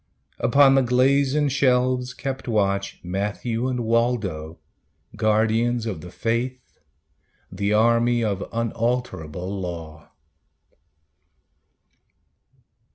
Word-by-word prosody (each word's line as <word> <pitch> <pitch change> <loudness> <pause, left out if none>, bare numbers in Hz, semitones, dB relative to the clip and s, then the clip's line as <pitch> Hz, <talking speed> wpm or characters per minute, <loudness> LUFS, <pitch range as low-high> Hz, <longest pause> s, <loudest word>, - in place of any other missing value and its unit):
Upon 140 +2 +5
the 135 - +5
glazen 135 +3 +2
shelves 125 -2 +1
kept 135 0 -5
watch 100 -3 0
Matthew 105 +6 -2
and 125 -2 -2
Waldo, 110 -9 -1 0.6
guardians 110 +2 +1
of 95 -8 -4
the 90 - -9
faith, 120 +6 -3 0.7
The 100 +3 -1
army 115 +2 +3
of 100 -3 -2
unalterable 115 -6 -2
law. 80 -4 -7
115 Hz, 85 wpm, -23 LUFS, 100-125 Hz, 0.7 s, Upon